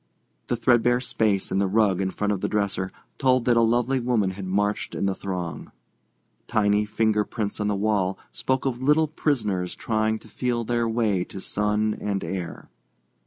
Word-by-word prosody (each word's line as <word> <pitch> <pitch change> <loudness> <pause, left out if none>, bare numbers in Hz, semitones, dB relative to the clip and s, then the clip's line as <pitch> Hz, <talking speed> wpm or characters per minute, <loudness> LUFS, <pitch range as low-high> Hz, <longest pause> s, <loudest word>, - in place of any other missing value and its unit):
The - - 0
threadbare 120 0 +3
space 110 -6 0
in 95 - +1
the 100 - +2
rug 100 -2 +2
in 95 - 0
front 105 +2 -1
of 95 - -4
the - - -1
dresser 100 -3 -1 0.3
told 130 -2 +3
that 125 - +4
lovely 120 +3 +2
woman 120 -6 +1
had 95 0 -7
marched 105 +2 -1
in - - -1
the 95 - +1
throng. 90 -5 -5 0.8
Tiny 105 -2 +2
finger 105 0 +1
prints 105 -1 -4
on 105 - 0
the 105 - +1
wall 100 -2 +1
spoke 130 0 -1
of 125 -2 -1
little 150 +4 +4
prisoners 105 - -1
trying 110 0 0
to 110 - -16
feel 120 +1 -1
their 120 0 0
way 110 -5 +1
to 95 - -8
sun 105 +2 0
and 100 -1 -1
air. 90 -3 -5
105 Hz, 175 wpm, -25 LUFS, 100-120 Hz, 0.8 s, that